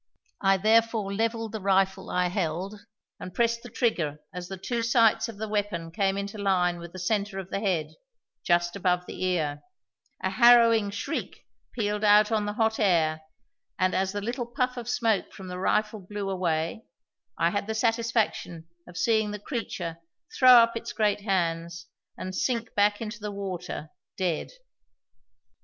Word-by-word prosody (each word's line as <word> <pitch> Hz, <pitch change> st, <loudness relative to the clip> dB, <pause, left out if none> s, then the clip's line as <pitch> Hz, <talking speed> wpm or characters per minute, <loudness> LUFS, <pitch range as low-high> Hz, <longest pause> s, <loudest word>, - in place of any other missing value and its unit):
I 195 Hz, -1 st, +4 dB
therefore 220 Hz, 0 st, +2 dB
levelled 225 Hz, +1 st, -1 dB
the 220 Hz, -2 st, -5 dB
rifle 190 Hz, 0 st, +1 dB
I 180 Hz, 0 st, +1 dB
held, 185 Hz, +3 st, -3 dB, 0.3 s
and 180 Hz, 0 st, -8 dB
pressed 230 Hz, 0 st, +1 dB
the 245 Hz, -, -10 dB
trigger 170 Hz, -, -1 dB
as 180 Hz, 0 st, -6 dB
the 190 Hz, +1 st, -6 dB
two 235 Hz, +5 st, -2 dB
sights 230 Hz, -1 st, +3 dB
of 225 Hz, -, -9 dB
the 220 Hz, +1 st, -4 dB
weapon 205 Hz, -6 st, -2 dB
came 195 Hz, +2 st, 0 dB
into 200 Hz, +1 st, -5 dB
line 180 Hz, -3 st, +1 dB
with 170 Hz, 0 st, -9 dB
the 185 Hz, -, -10 dB
centre 200 Hz, +2 st, -1 dB
of 190 Hz, -1 st, -6 dB
the -, -, -1 dB
head, 185 Hz, -7 st, -1 dB, 0.5 s
just 175 Hz, 0 st, +1 dB
above 180 Hz, -2 st, 0 dB
the -, -, -6 dB
ear; 160 Hz, -6 st, 0 dB, 0.6 s
a -, -, 0 dB
harrowing 230 Hz, -3 st, +6 dB
shriek 200 Hz, +1 st, -5 dB, 0.3 s
pealed 210 Hz, -2 st, -1 dB
out 210 Hz, +1 st, +6 dB
on 215 Hz, -2 st, +1 dB
the 210 Hz, -, -2 dB
hot 220 Hz, 0 st, +1 dB
air 160 Hz, -6 st, +2 dB, 0.6 s
and, 185 Hz, 0 st, +1 dB
as 190 Hz, 0 st, 0 dB
the 205 Hz, 0 st, -4 dB
little 240 Hz, +3 st, -3 dB
puff 250 Hz, 0 st, -1 dB
of 240 Hz, -1 st, -6 dB
smoke 225 Hz, -4 st, +1 dB
from 190 Hz, -2 st, -9 dB
the 180 Hz, 0 st, -5 dB
rifle 215 Hz, +3 st, 0 dB
blew 200 Hz, +1 st, -5 dB
away, 170 Hz, +1 st, -1 dB, 0.5 s
I 170 Hz, +1 st, +2 dB
had 205 Hz, +1 st, -2 dB
the 220 Hz, -, -2 dB
satisfaction 225 Hz, -7 st, 0 dB, 0.2 s
of 180 Hz, 0 st, -11 dB
seeing 220 Hz, -2 st, +2 dB
the 210 Hz, -, -4 dB
creature 195 Hz, -, -5 dB, 0.4 s
throw 255 Hz, -1 st, +8 dB
up 230 Hz, -1 st, +6 dB
its 230 Hz, -, -5 dB
great 210 Hz, -1 st, +1 dB
hands 170 Hz, -4 st, -1 dB, 0.3 s
and 185 Hz, -, -5 dB
sink 230 Hz, +3 st, -1 dB
back 205 Hz, +1 st, +2 dB
into 215 Hz, -1 st, -5 dB
the 210 Hz, 0 st, -4 dB
water, 185 Hz, -5 st, -5 dB, 0.3 s
dead. 180 Hz, -4 st, -1 dB
200 Hz, 170 wpm, -27 LUFS, 180-225 Hz, 0.6 s, throw